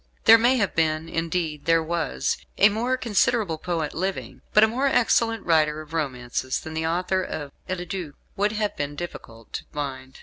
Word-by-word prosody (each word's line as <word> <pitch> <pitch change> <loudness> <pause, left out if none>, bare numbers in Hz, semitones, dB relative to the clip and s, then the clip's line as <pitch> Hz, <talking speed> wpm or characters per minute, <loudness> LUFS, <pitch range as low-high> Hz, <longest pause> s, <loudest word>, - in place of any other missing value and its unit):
There 225 0 +8
may 240 +3 +4
have 200 -5 0
been 160 0 +1
indeed, 165 -2 -2
there 165 0 +4
was 170 +1 -1 0.2
a 205 - +7
more 240 +5 0
considerable 210 -7 +1
poet 165 -3 -2
living; 190 +3 -4
but 210 - +6
a - - +7
more 255 +5 0
excellent 230 -3 +2
writer 155 -2 +3
of 155 0 -11
romances, 130 -4 -2
than 160 - -8
the 160 0 -1
author 180 +3 0
of 145 -5 -5 0.2
"Eliduc," 185 -1 -3
it 145 - -17 0.2
would 205 +2 +1
have 210 -1 -1
been 145 0 -3
difficult 115 -9 -9
to - - -4
find. 135 -3 -6
165 Hz, 180 wpm, -25 LUFS, 155-210 Hz, 0.2 s, There